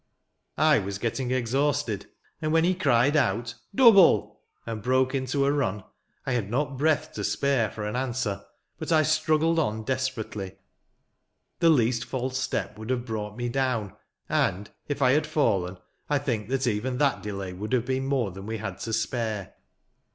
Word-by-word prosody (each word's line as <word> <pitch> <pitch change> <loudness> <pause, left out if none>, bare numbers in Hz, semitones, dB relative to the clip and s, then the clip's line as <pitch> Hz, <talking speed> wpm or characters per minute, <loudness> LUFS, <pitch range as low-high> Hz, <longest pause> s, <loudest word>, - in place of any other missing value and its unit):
" - - -49 0.2
I 140 - +5
was 100 -1 -4
getting 120 +4 -2
exhausted; 130 -3 0 0.3
and, 155 -1 -1
when 165 0 +4
he 180 +2 +3
cried 140 -5 +3
out, 115 -4 +1
" - - -24
Double! 200 -7 +6
" - - -43
and 115 -2 -5
broke 130 +3 +2
into 135 +1 0
a 140 - +3
run, 105 -9 -1 0.4
I 135 - -1
had 115 -5 -1
not 135 +4 -1
breath 155 +3 +1
to 105 - -4
spare 115 +2 +1
for 105 0 -6
an 105 - -3
answer; 125 -5 -2 0.4
but - - -4
I 155 -1 +5
struggled 155 +1 +2
on 110 -7 -1
desperately. 120 -6 -3 1.1
The 170 - +5
least 120 -5 +3
false 130 0 -3
step 130 - -3
would 110 +2 -7
have 125 -2 -1
brought 105 -2 -4
me 120 0 -2
down; 120 -5 -1 0.3
and, 100 +3 0 0.2
if 145 -1 -1
I 130 - +5
had 150 +3 +2
fallen, 100 - +1 0.3
I 145 - +3
think 120 -6 -2
that 135 0 0
even 125 +2 -1
that 140 +1 +2
delay 100 -3 -5
would 105 +5 -6
have 125 -2 +2
been 130 +1 -1
more 130 -7 0
than 95 +3 -9
we 110 0 -3
had 100 -3 -6
to 115 - -4
spare. 110 -2 -2
125 Hz, 180 wpm, -26 LUFS, 110-140 Hz, 1.1 s, Double